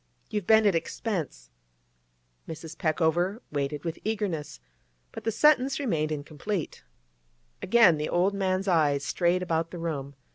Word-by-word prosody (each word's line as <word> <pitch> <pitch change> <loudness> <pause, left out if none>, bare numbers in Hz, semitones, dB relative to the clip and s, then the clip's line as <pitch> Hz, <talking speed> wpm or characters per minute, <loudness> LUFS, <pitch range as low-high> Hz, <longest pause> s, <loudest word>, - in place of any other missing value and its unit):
You've 210 -4 -3
been 220 -1 +6
at 200 - +4
expense—' 165 - -3 1.0
Mrs. 160 0 -8
Peckover 170 +5 0
waited 145 0 -2
with 165 - -4
eagerness, 195 - -3 0.5
but - - -9
the 225 - +1
sentence 275 +2 +3
remained 160 - -1
incomplete. 155 +5 -4 0.8
Again 200 -6 +5
the 150 - -2
old 185 +3 +2
man's 190 0 -1
eyes 150 -6 +2
strayed 175 +3 +1
about 165 -1 -1
the 175 - -8
room. 145 -5 -4
170 Hz, 135 wpm, -27 LUFS, 155-200 Hz, 1.0 s, been